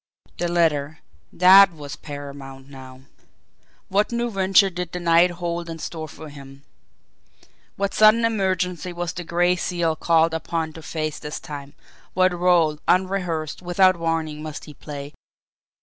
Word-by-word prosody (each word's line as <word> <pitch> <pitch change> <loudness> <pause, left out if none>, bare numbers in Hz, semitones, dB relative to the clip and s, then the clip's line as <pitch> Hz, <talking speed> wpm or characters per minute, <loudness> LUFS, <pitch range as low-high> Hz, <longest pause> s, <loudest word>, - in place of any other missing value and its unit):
The 175 - 0
letter 160 -3 0 0.3
that 190 +2 +7
was 145 -3 -9
paramount 140 -2 -9
now. 130 -1 -12 0.9
What 205 +4 +1
new 235 0 -2
venture 195 0 +3
did 180 -1 -5
the 180 - -3
night 170 +1 +4
hold 170 -1 -4
in 165 - -6
store 160 0 -6
for 155 0 -11
him? 140 -1 -13 1.1
What 200 0 -2
sudden 215 +2 +5
emergency 185 -4 -1
was 175 -1 -4
the 175 - -6
Gray 175 +2 +1
Seal 175 -2 -1
called 165 0 +2
upon 160 -1 -3
to 160 - -10
face 155 -1 -4
this 150 - -6
time 145 -1 -9 0.4
what 185 0 +3
role, 175 -4 +2
unrehearsed, 180 -5 0
without 185 +1 +3
warning, 165 -2 -2
must 155 -1 -7
he 150 - -11
play? 145 -1 -9
170 Hz, 145 wpm, -22 LUFS, 150-180 Hz, 1.1 s, that